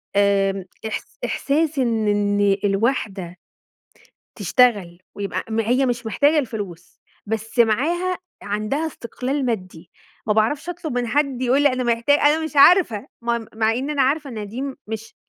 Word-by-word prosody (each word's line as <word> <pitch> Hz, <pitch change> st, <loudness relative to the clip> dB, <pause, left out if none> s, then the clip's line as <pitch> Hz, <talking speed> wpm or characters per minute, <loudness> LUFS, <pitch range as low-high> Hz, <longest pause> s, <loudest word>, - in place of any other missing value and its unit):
آمم، 195 Hz, -1 st, +2 dB, 0.2 s
إحس -, -, -6 dB
إحساس 300 Hz, 0 st, 0 dB
إن 225 Hz, -4 st, +1 dB
إن 205 Hz, -1 st, +2 dB
الواحدة 195 Hz, -4 st, -1 dB, 1.0 s
تشتغل 205 Hz, -9 st, +2 dB, 0.2 s
ويبقى 200 Hz, -1 st, -3 dB
م 225 Hz, +1 st, +1 dB
هي 250 Hz, +4 st, +2 dB
مش 240 Hz, -1 st, -2 dB
محتاجة 290 Hz, +7 st, +3 dB
الفلوس 205 Hz, -, -5 dB, 0.3 s
بس 225 Hz, +3 st, -4 dB
معاها، 325 Hz, +12 st, +2 dB, 0.2 s
عندها 215 Hz, +10 st, -2 dB
استقلال 265 Hz, 0 st, -3 dB
مادي، 185 Hz, -7 st, -4 dB, 0.4 s
ما 210 Hz, -, +3 dB
باعرفش 255 Hz, +10 st, 0 dB
أطلب 335 Hz, -4 st, -5 dB
من 245 Hz, -, -1 dB
حد، 275 Hz, 0 st, 0 dB
يقول 260 Hz, +3 st, +3 dB
لي 290 Hz, -, +6 dB
أنا 255 Hz, 0 st, -2 dB
محتا 235 Hz, +3 st, +2 dB
أنا 295 Hz, +2 st, +3 dB
مش 315 Hz, -, -5 dB
عارفة 280 Hz, -, +5 dB, 0.2 s
م 235 Hz, -1 st, -1 dB
مع 220 Hz, 0 st, +2 dB
إن 260 Hz, +5 st, -2 dB
أنا 285 Hz, -3 st, +2 dB
عارفة 285 Hz, +2 st, 0 dB
إن 215 Hz, -3 st, -5 dB
دي 240 Hz, +6 st, -5 dB, 0.2 s
مش 220 Hz, 0 st, -7 dB
235 Hz, 150 wpm, -22 LUFS, 205-280 Hz, 1.0 s, لي